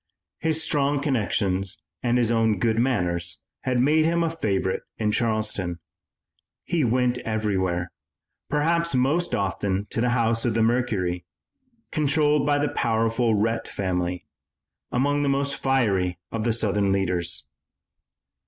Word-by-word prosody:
His 160 0 0
strong 145 -1 +1
connections 100 -8 0 0.2
and 120 0 +1
his 120 -2 +2
own 110 -2 +2
good 110 +3 +1
manners 90 -9 0 0.3
had 125 -1 +1
made 150 +5 +4
him 170 +1 +2
a 165 - 0
favorite 100 -12 -1 0.2
in 105 -1 0
Charleston. 105 -6 -1 0.9
He 170 -4 0
went 125 +1 +1
everywhere, 95 -6 -1 0.6
perhaps 165 +2 +1
most 145 +8 +1
often 95 -1 -1
to 115 - -1
the 125 - +2
office 115 -2 +1
of 120 -3 0
the 115 - +3
Mercury, 105 -7 0 0.7
controlled 150 -1 +2
by 145 -1 +3
the 145 0 +1
powerful 115 0 +1
Rhett 115 +2 0
family, 90 -2 -2 0.7
among 145 +3 +1
the 145 - +1
most 140 0 0
fiery 100 -10 +1
of 115 -1 -3
the 115 - +2
Southern 105 -3 +1
leaders. 90 -3 0
115 Hz, 135 wpm, -25 LUFS, 100-140 Hz, 0.9 s, made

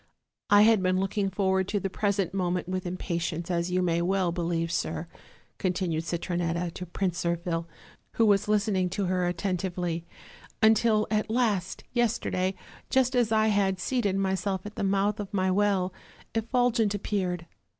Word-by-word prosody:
I 205 0 +7
had 220 -2 +5
been 185 0 +2
looking 195 +1 0
forward 190 -1 +1
to 205 - 0
the 195 - -2
present 200 -1 -1
moment 180 -2 -1
with 185 0 -3
impatience, 170 -1 -3
as 170 0 0
you 180 0 +1
may 170 -1 +1
well 185 0 +1
believe, 170 -1 -1
sir," 170 - -2 0.5
continued 175 -3 -1
Citronetta 170 0 -2
to 180 - -7
Prince 175 -1 -2
Zirphil, 170 -1 -1 0.5
who 230 - +3
was 205 -1 +3
listening 200 -3 +1
to 195 +2 -2
her 180 -1 +1
attentively, 175 -1 -2 0.5
"until, 220 -1 +4
at 215 0 0
last, 215 -6 0
yesterday, 215 -6 0 0.3
just 260 0 +2
as 240 -3 +2
I 220 0 +3
had 195 -2 +1
seated 210 -2 0
myself 190 0 -1
at 210 - -7
the - - -3
mouth 200 +2 +1
of 205 -2 -5
my 185 -1 +2
well, 190 -2 +1 0.4
Effulgent 230 -2 +1
ap 205 - -5
peared. 180 -4 -1
190 Hz, 160 wpm, -28 LUFS, 175-205 Hz, 0.5 s, I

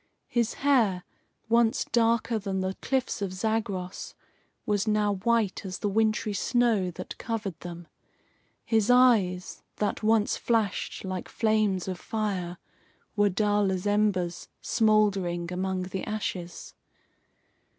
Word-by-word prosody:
His 235 -2 0
hair, 220 -10 +3 0.4
once 230 0 +3
darker 230 0 +1
than 195 -2 -2
the 190 0 -1
cliffs 265 -5 -1
of 195 -2 -2
Zagros, 195 -2 -3 0.5
was 205 0 0
now 210 -1 +2
white 225 -1 +1
as 185 -2 -5
the 205 - -1
wintry 215 0 +1
snow 225 -2 +2
that 180 +1 -8
covered 215 -6 -4
them. 175 -1 -8 0.8
His 220 -2 +2
eyes, 220 -8 +3
that 210 - -1
once 220 -1 +2
flashed 225 -4 -1
like 185 -1 -4
flames 215 -5 +1
of 185 -2 -4
fire, 190 -5 -3 0.6
were 205 -1 +4
dull 205 0 +1
as 185 0 -3
embers 205 -4 0
smouldering 195 -6 +1
among 185 0 -1
the 185 +1 -5
ashes. 185 -5 -5
205 Hz, 120 wpm, -27 LUFS, 185-220 Hz, 0.8 s, were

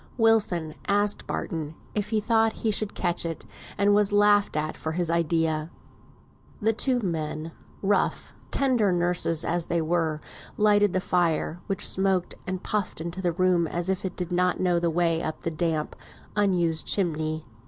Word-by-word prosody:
Wilson 205 -9 +2
asked 205 0 +1
Barton 160 -3 -4 0.2
if 210 -1 -2
he 220 - +1
thought 220 +1 +2
he 220 - +3
should 210 0 -1
catch 175 -1 0
it, 165 -2 -5 0.3
and 200 0 +4
was 205 0 +3
laughed 205 -3 +4
at 155 +1 -2
for 160 - -4
his 170 0 -1
idea. 160 -1 0 0.9
The 225 +1 +2
two 250 +2 +1
men, 160 -3 -3 0.3
rough, 200 +1 0 0.2
tender 250 -8 +2
nurses 175 -2 +1
as 170 0 -1
they 170 - 0
were, 160 -1 0 0.4
lighted 205 -2 +4
the 185 - +1
fire, 175 -2 0
which 195 +1 +1
smoked 190 -2 +1
and 185 0 -3
puffed 205 -6 -2
into 170 +3 -5
the 175 -2 0
room 180 -1 +2
as 175 +3 -2
if 190 -1 -1
it 190 - -4
did 180 -1 -3
not 180 0 +1
know 175 -2 +2
the 170 0 +1
way 165 0 +1
up 155 -1 -4
the 165 - -2
damp, 160 -1 -1 0.4
unused 175 -6 +1
chimney. 155 -4 0
175 Hz, 165 wpm, -26 LUFS, 165-205 Hz, 0.9 s, and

